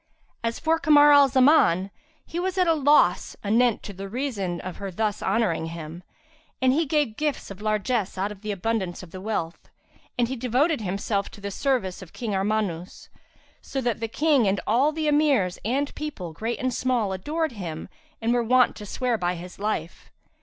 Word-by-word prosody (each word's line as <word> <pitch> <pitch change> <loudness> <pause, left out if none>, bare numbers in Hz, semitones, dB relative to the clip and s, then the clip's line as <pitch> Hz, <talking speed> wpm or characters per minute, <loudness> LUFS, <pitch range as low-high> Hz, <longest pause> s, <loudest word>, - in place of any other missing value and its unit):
As 230 0 -1
for 325 +1 +1
Kamar 295 -1 +6
al 285 -1 +7
Zaman, 255 - +4 0.3
he 340 - -5
was 370 +1 -2
at 365 - +4
a 330 - +4
loss 290 - +3
anent 230 +2 +2
the 195 -1 -7
reason 205 -8 -3
of 185 -1 -7
her 200 - -5
thus 210 +2 -2
honouring 185 -8 0
him; 165 0 -7 0.6
and 260 0 +3
he 315 +2 +1
gave 285 -7 0
gifts 295 -8 -2
and 195 +1 -10
largesse 215 -1 -1
out 195 +2 -1
of 200 -2 -11
the 215 -1 -3
abundance 195 -2 -2
of 170 - -12
the 185 - -8
wealth; 190 -6 -4 0.5
and 240 -1 +2
he 260 - -3
devoted 255 +4 +1
himself 200 +1 -2
to - - -13
the 200 0 -5
service 230 -7 -1
of 185 - -12
King 225 -4 -4
Armanus; 195 -3 -2 0.5
so 270 - -4
that 240 -4 -1
the 225 - -2
King 280 -1 +2
and 195 +1 +1
all 260 +7 +3
the 310 0 -2
Emirs 285 -12 +2
and 275 +6 -1
people, 240 - -6
great 225 +8 -3
and 255 -1 -1
small, 235 -6 0
adored 310 - -2
him 175 -8 -6 0.3
and 230 +1 +1
were 245 - +2
wont 250 +2 +3
to 210 - -8
swear 245 +1 -1
by 180 0 0
his 180 +2 -10
life. 200 -6 -3
225 Hz, 190 wpm, -25 LUFS, 190-270 Hz, 0.6 s, al